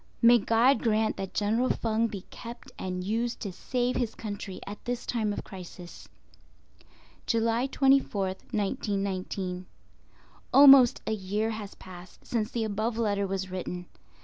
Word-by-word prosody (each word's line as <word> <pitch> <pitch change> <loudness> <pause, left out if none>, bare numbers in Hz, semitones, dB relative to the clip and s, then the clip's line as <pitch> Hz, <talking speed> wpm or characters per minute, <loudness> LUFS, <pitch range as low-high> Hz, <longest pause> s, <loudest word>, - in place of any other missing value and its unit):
May 235 +1 +7
God 230 +6 +3
grant 220 -1 +1
that 195 -1 -6
General 225 +5 +1
Feng 225 0 +1
be 200 -4 -6
kept 235 0 -10
and 180 -1 -3
used 230 +4 -1
to 200 - -4
save 245 +6 -1
his 235 -3 -2
country 205 -3 -6
at 205 +1 -8
this 245 0 -3
time 220 -3 -1
of 205 - -4
crisis. 180 -2 -11 1.2
July 230 +2 +1
24th, 265 -9 +2
1919.—Almost 200 +5 +2
a 220 - -1
year 210 +2 -1
has 215 -2 -7
passed 180 -1 -13
since 220 -2 -1
the 235 -2 -2
above 220 +2 -2
letter 200 -3 0
was 190 -1 -3
written. 180 -1 -5
215 Hz, 135 wpm, -28 LUFS, 195-235 Hz, 1.2 s, May